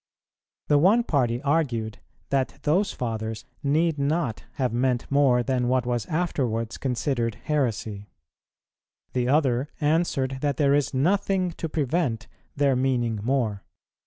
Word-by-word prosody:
The 145 - +4
one 205 +9 +5
party 125 - 0
argued 125 -8 0 0.3
that 135 0 0
those 190 +7 +2
Fathers 110 -2 -4 0.2
need 155 +2 +1
not 140 -5 -1
have 125 -4 -1
meant 125 0 +1
more 135 -3 +4
than 125 0 0
what 125 -1 +1
was 120 -3 -1
afterwards 125 -9 -1
considered 125 -3 -1
heresy; 115 -8 -2 1.0
the 125 -1 0
other 135 -1 +2
answered 145 -4 0
that 145 -3 0
there 140 -2 +3
is 145 -1 +2
nothing 185 +4 +1
to 165 0 -5
prevent 135 -6 -1 0.3
their 140 -2 +2
meaning 125 -4 0
more. 115 -4 -1
135 Hz, 130 wpm, -25 LUFS, 120-150 Hz, 1.0 s, one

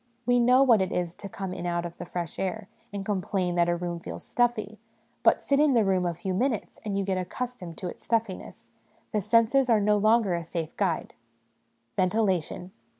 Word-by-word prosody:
We 245 +1 +4
know 250 +3 +6
what 235 -6 +5
it 190 - -1
is 175 -1 -1
to 200 +2 -9
come 190 0 -5
in 175 -1 -4
out 175 0 -1
of 170 0 -8
the - - -6
fresh 170 -3 -5
air 195 +2 -3 0.2
and 200 -1 -5
complain 190 -2 -1
that 175 0 +2
a 175 - +2
room 175 0 -4
feels - - -8
stuffy; 220 -3 0 0.4
but - - +4
sit 280 0 +2
in 300 -2 +4
the 230 -4 +4
room 185 -2 +2
a 170 - -2
few 190 +3 -3
minutes, 230 +1 -1
and 205 -2 -2
you 200 - 0
get 190 -1 0
accustomed 185 -2 -5
to 185 - -4
its - - -9
stuffiness; 225 -5 -3 0.4
the 210 - 0
senses 230 +5 +3
are 225 -2 +5
no 210 +1 +3
longer 215 -2 +3
a 170 -1 -2
safe 165 -1 -5
guide. 185 -5 -1 0.8
Ventilation. 185 -2 0
195 Hz, 205 wpm, -27 LUFS, 180-225 Hz, 0.8 s, know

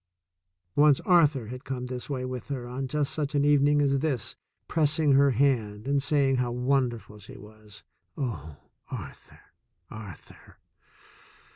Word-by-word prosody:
Once 145 -2 +5
Arthur 150 -9 +3
had 125 +1 -8
come 125 -1 -4
this 125 +1 -6
way 130 -3 -3
with 130 -1 -6
her 130 -4 -4
on 130 +2 -4
just 145 +1 -1
such 150 -1 -2
an 145 0 +3
evening 145 0 +4
as 140 -1 +2
this, 135 -6 -1 0.3
pressing 155 -1 +2
her 140 +1 +5
hand 115 -5 0
and 140 0 +2
saying 140 -2 +2
how 125 -1 0
wonderful 120 -4 -1
she 130 +6 -12
was. 105 -3 -14 0.3
Oh, 80 - -5 0.3
Arthur! - - -9 0.5
Arthur! 105 -7 -12
130 Hz, 140 wpm, -27 LUFS, 120-145 Hz, 0.5 s, Once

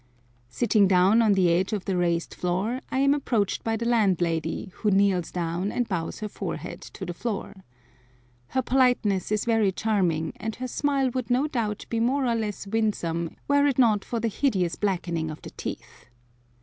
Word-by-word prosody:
Sitting 205 - +3
down 190 +4 +5
on 215 -3 +4
the 185 -3 +3
edge 185 +5 +1
of 205 -3 -2
the 195 - -1
raised 170 -1 0
floor, 195 +8 -1
I - - -2
am 275 +1 +4
approached 235 -8 0
by 225 0 0
the 235 - -3
landlady, 180 -6 +1
who 215 - +1
kneels 195 -3 +2
down 175 +3 -2
and 245 -2 -1
bows 180 -3 -3
her 215 - -2
forehead 210 - -6
to 190 - -8
the 175 - -4
floor. 205 0 -4 0.9
Her 260 - -1
politeness 245 -7 +2
is 210 -1 0
very 225 -4 +3
charming, 180 -7 0
and 220 0 -4
her 255 - -4
smile 275 0 0
would 255 -1 -3
no 250 +4 +2
doubt 225 -8 -2
be 230 - -1
more 260 +4 +1
or 240 - +2
less 215 -3 -3
winsome 195 -6 -1
were 285 0 +4
it 275 - 0
not 220 -6 +4
for 235 - -3
the 230 - 0
hideous 195 -7 0
blackening 170 -5 -1
of 155 - -8
the - - -8
teeth. - - -8
210 Hz, 185 wpm, -26 LUFS, 180-235 Hz, 0.9 s, down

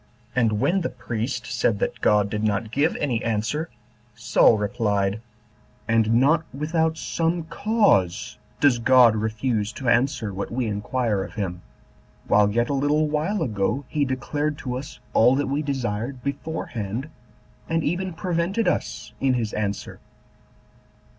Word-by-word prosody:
And 115 -4 +2
when 190 - +2
the - - -1
priest 120 0 -4
said 120 -3 0
that - - -3
God 105 -1 +3
did 105 0 -2
not 110 +1 0
give 145 +6 +1
any 125 -6 -1
answer, 115 +9 -1 0.5
Saul 115 0 +4
replied, 105 -1 0 0.7
"And 115 0 +3
not 150 +7 +4
without 160 +3 0
some 165 +1 -1
cause 165 - +1 0.2
does 140 -5 +4
God 120 -2 +6
refuse 110 0 -1
to 130 - -6
answer 120 -4 +1
what 100 +1 -4
we 125 +1 -1
inquire 105 0 -1
of - - -10
him, 90 -5 -3 0.7
while 105 0 +4
yet 120 +3 +1
a - - 0
little 145 +3 +2
while 160 +6 0
ago 115 +3 -1
he 150 - 0
declared 145 +3 -2
to 125 -3 -4
us 135 +3 -7
all 125 +3 +5
that 145 +1 0
we 140 +2 -1
desired 125 -3 -3
beforehand, 135 -5 -4 0.6
and 165 0 +1
even 180 +4 -1
prevented 180 +5 -1
us 105 0 -2
in 135 -2 +2
his 115 -3 -2
answer. 100 -2 -3
125 Hz, 145 wpm, -24 LUFS, 110-150 Hz, 0.7 s, God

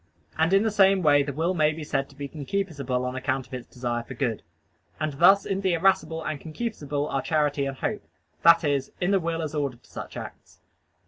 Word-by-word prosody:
And 160 +2 +2
in 195 +2 +5
the 220 - +1
same 195 -2 +4
way 145 -2 +5
the 140 0 -2
will 165 +6 0
may 155 -3 +2
be 160 0 -7
said 140 -2 -2
to 140 - -18
be 140 0 -5
concupiscible 140 -5 -2
on 125 0 -3
account 130 0 -1
of - - -18
its 125 -2 -6
desire 120 -1 -3
for 130 +2 -9
good. 120 -4 -1 0.6
And 155 -1 -1
thus 185 +7 +5
in 195 0 -1
the 190 -2 +1
irascible 165 -2 +1
and 155 -2 -4
concupiscible 150 -6 -3
are 135 - +1
charity 145 -2 0
and 135 -1 -5
hope - - -2 0.4
that 170 0 +6
is, 140 -3 0
in 180 +2 +1
the 195 - +4
will 165 -1 -2
as 155 -1 -4
ordered 140 -5 -3
to - - -22
such - - -7
acts. - - -10
150 Hz, 220 wpm, -26 LUFS, 135-170 Hz, 0.6 s, that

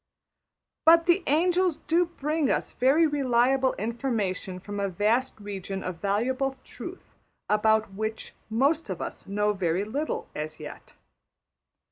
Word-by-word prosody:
But 330 +1 +7
the 350 +2 +4
angels 350 +2 +2
do 345 +2 +1
bring 305 -3 -1
us - - -1
very 275 +6 +4
reliable 265 -2 +2
information 215 -5 -2
from 205 +2 -6
a 200 -1 0
vast 215 +7 0
region 195 -2 -5
of 180 -2 -5
valuable 255 +7 0
truth - - -9 0.3
about 215 -1 +2
which 220 +2 -4 0.2
most 275 +5 +1
of 185 -3 -3
us - - -6
know 210 +1 +1
very 185 -1 0
little 280 +9 -3
as 155 +1 -5
yet. 150 - -10
225 Hz, 130 wpm, -27 LUFS, 200-290 Hz, 0.3 s, But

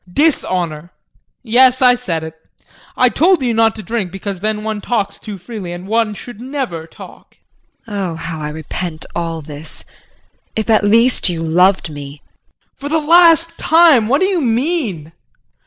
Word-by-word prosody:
JEAN. 310 - +4
Dishonor 170 - -4 0.5
yes, 250 +2 +4
I 250 -2 +6
said 180 -10 -3
it. 160 0 -7 0.6
I 255 - +5
told 320 - +2
you 240 -2 0
not 225 0 +2
to 215 - -8
drink 205 -2 -3
because 195 0 -6
then 215 +1 -2
one 215 -1 -3
talks 205 -4 -2
too 210 -3 -8
freely 190 -2 -8
and 175 +2 -8
one 220 0 0
should 230 +1 -10
never 250 - -5
talk. - - -15 0.5
JULIE. 210 -3 -6
Oh, 180 -4 -3
how 165 -1 -6
I 150 - -4
repent 160 +1 -6
all 165 -2 -3
this. 150 +1 -11 0.7
If 220 +1 -1
at 215 - +4
least 230 +1 +3
you 165 -2 -3
loved 180 +1 +2
me! 145 0 -9
JEAN. - - -40 0.4
For 280 +1 -6
the 320 - +1
last 335 +1 +4
time 320 -9 +5
what 275 +7 +2
do - - +4
you 380 -3 0
mean? 235 - -1
215 Hz, 170 wpm, -16 LUFS, 170-255 Hz, 0.7 s, I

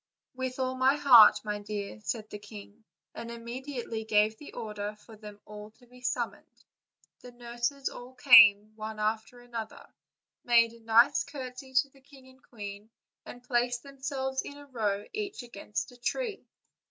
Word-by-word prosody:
"With 260 0 -4
all 260 -1 -1
my 260 +2 +3
heart, 250 -7 +8
my 210 -1 -3
dear," 205 0 -6
said 215 0 -4
the 210 - -7
king, 210 +1 -13 0.3
and 235 - -7
im 235 0 -8
mediately 240 -2 -5
gave 215 0 +2 0.2
order 210 -2 -5
for 220 +1 -16
them 210 -1 -12
all 210 0 -10
to 245 - -21
be 250 +1 -18
summoned. 250 - -4 0.5
The 250 - -12
nurses 240 +3 -3
all 250 +1 -8
came, 215 -5 +7
one 215 0 -7
after 220 +3 -2
another, 230 -3 -7 0.6
made 230 -1 +4
a 230 - -15
nice 230 +5 +4
courtesy 260 -2 -9
to 280 - -22
the 270 - -22
king 270 -1 -18
and 260 0 -21
queen, 205 -3 -9 0.4
and 245 - -10
placed 245 -1 0
thems3lves 265 -1 -3
in 285 - -9
a 290 - -12
row 210 -6 -2
each 410 -8 -4
against 210 -2 -5
a 245 - -16
tree. 435 - -3
240 Hz, 165 wpm, -29 LUFS, 215-260 Hz, 0.6 s, heart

